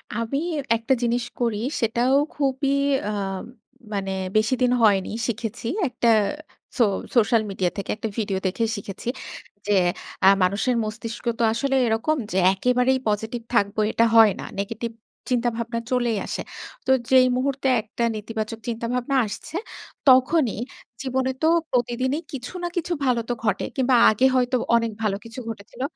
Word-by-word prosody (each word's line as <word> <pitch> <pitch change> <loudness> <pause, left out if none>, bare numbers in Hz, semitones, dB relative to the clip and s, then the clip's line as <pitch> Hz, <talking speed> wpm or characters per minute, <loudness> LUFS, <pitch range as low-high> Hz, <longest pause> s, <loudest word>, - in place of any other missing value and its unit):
আমি 230 +4 -1 0.4
একটা 230 +3 +1
জিনিস 240 +1 +1 0.2
করি 230 -4 0 0.2
সেটাও 235 +3 +2 0.2
খুবই 275 -1 0 0.4
আম 195 -2 -3 0.5
মানে 195 -1 -2 0.3
বেশিদিন 245 +3 +2
হয়নি 200 -4 +4 0.2
শিখেছি। 225 0 -4 0.2
একটা 245 -1 -1 0.7
সো 245 - +5 0.3
সোশ্যাল 230 -1 +4
মিডিয়া 185 -2 0
থেকে 200 - -5
একটা 220 +1 -4
ভিডিও 200 -4 -1
দেখে 215 +5 -1
শিখেছি। 200 +2 -8 0.6
যে - - +1 0.5
আ - - +8 0.2
মানুষের 205 +7 +1
মস্তিষ্ক 225 +2 -6
তো - - +2
আসলে 270 +3 0
এরকম 230 +8 +1
যে 185 - -1 0.2
একেবারেই 250 +5 +2
পজিটিভ 220 +3 -1
থাকবো 205 -2 +1
এটা 230 - +3
হয় 225 -2 +8
না। - - -5 0.2
নেগেটিভ 225 +3 -3 0.4
চিন্তা 245 -1 +2
ভাবনা 235 0 -3
চলেই 240 -3 +1
আসে। - - -4 0.4
তো - - +2 0.2
যেই 255 -1 +7
মুহূর্তে 275 +1 -1
একটা 220 +2 -5
নেতিবাচক 220 +1 -4
চিন্তাভাবনা 240 +3 -2
আসছে 210 +9 -7 0.5
তখনই 255 -2 +4 0.4
জীবনে 260 0 0
তো 315 - +5 0.2
প্রতিদিনই 255 +4 0
কিছু 250 +2 -6
না - - 0
কিছু 345 +1 -1
ভালো 245 -2 +2
তো 245 - +2
ঘটে। 210 -3 0
কিংবা 260 -1 +3
আগে 215 +5 +2
হয়তো 250 0 +2 0.2
অনেক 230 -1 +1
ভালো 210 -3 +1
কিছু 230 +3 -8
ঘটেছিল। 215 +2 -9
235 Hz, 145 wpm, -24 LUFS, 215-255 Hz, 0.7 s, আ